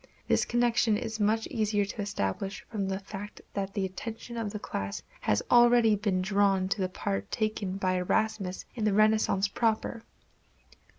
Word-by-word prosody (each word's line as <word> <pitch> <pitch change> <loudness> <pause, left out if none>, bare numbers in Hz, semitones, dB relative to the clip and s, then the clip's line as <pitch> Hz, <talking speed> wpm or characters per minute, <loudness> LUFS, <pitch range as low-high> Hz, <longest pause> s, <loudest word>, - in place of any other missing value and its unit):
This - - +3
connection 240 -2 +2
is 220 +1 -4
much 220 +2 +2
easier 210 -2 +1
to 205 +2 -5
establish 195 - -3
from 205 -4 -1
the 190 0 -1
fact 200 +1 -8
that 195 -1 -3
the 200 -2 0
attention 225 +5 -7
of 225 -3 -3
the 210 - -4
class 100 - -4 0.2
has 105 - +1
already 240 -2 +6
been 195 -3 0
drawn 195 -1 +2
to 200 0 -1
the 185 - 0
part 100 - -3
taken 215 -3 -2
by 185 -1 +1
Erasmus 195 0 -1
in 230 - -4
the 210 - +3
Renaissance 215 -1 +3
proper. 225 +2 0
205 Hz, 165 wpm, -29 LUFS, 195-220 Hz, 0.2 s, already